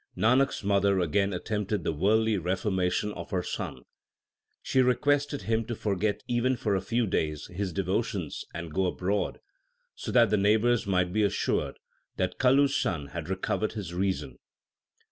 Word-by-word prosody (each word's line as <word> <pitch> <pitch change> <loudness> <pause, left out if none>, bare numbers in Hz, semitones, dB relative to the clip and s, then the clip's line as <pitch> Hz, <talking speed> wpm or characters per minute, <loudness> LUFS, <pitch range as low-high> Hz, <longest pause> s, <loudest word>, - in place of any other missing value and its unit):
Nanak 130 +5 +4
s - - -6
mother 100 -1 +3
again 100 +4 +1
attempted 105 0 -2
the - - 0
worldly 110 +7 +2
reformation 95 +2 0
of 85 -3 -8
her 90 -2 -1
son. - - -5 0.8
She 130 - +2
requested 145 +3 +1
him 115 0 +1
to 120 0 -4
forget 105 0 -1
even 125 +2 +1
for 105 -3 0
a 95 - +1
few 115 +4 0
days 75 -6 -1
his 95 0 -2
devotions 95 - -2
and 85 -2 -7
go 95 +1 +1
abroad, 95 +3 -1 0.5
so - - -6
that 115 -4 +5
the 105 - +4
neighbours 110 +3 +3
might 90 -2 +1
be 110 - +2
assured 100 -3 0 0.4
that - - -1
Kalu 135 +2 +5
s 140 - -1
son 85 - -1
had 85 +2 -6
recovered 95 +3 -1
his 100 -6 -5
reason. 95 +1 -2
100 Hz, 165 wpm, -28 LUFS, 90-115 Hz, 0.8 s, that